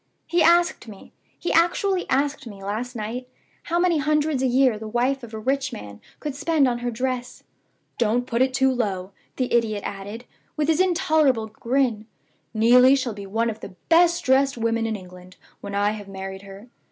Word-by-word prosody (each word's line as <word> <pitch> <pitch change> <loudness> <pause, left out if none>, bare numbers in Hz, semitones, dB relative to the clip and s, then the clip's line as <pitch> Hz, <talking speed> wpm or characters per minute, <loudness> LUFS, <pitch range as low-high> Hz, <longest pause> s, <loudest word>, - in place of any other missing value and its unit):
He 345 0 +1
asked 340 -6 +3
me 205 -3 -13 0.2
he 350 - -2
actually 360 +3 +2
asked 280 0 0
me, 200 -3 -10
last 225 +5 -4
night 235 +3 -5 0.4
how 340 - -1
many 345 -2 +2
hundreds 300 -1 +1
a 265 - +2
year 250 -3 +3
the 220 - -7
wife 250 +4 0
of 235 -3 -10
a 220 - -6
rich 265 +4 -1
man 105 - -9 0.2
could 295 -2 -4
spend 290 0 +2
on 240 -1 -1
her 245 0 -2
dress. 250 +1 -4 0.6
'Don't 240 +2 +1
put 235 0 -1
it 260 0 +3
too 265 0 +2
low,' 195 -6 -2 0.2
the 255 -1 -2
idiot 220 -3 +1
added, 205 +4 -7 0.3
with 300 0 0
his 320 0 +2
intolerable 310 -9 +2
grin. 230 0 -1 0.4
'Neelie 250 +4 +6
shall 255 -4 -2
be 200 -1 -9
one 225 +3 0
of 220 - -10
the 195 - -10
best 340 +1 +4
dressed 270 0 +3
women 230 0 0
in 220 - -2
England 180 -1 -12 0.2
when 200 0 -6
I 205 +1 +2
have 210 -2 -7
married 190 0 -7
her. 200 +3 -12
245 Hz, 190 wpm, -23 LUFS, 215-275 Hz, 0.6 s, Neelie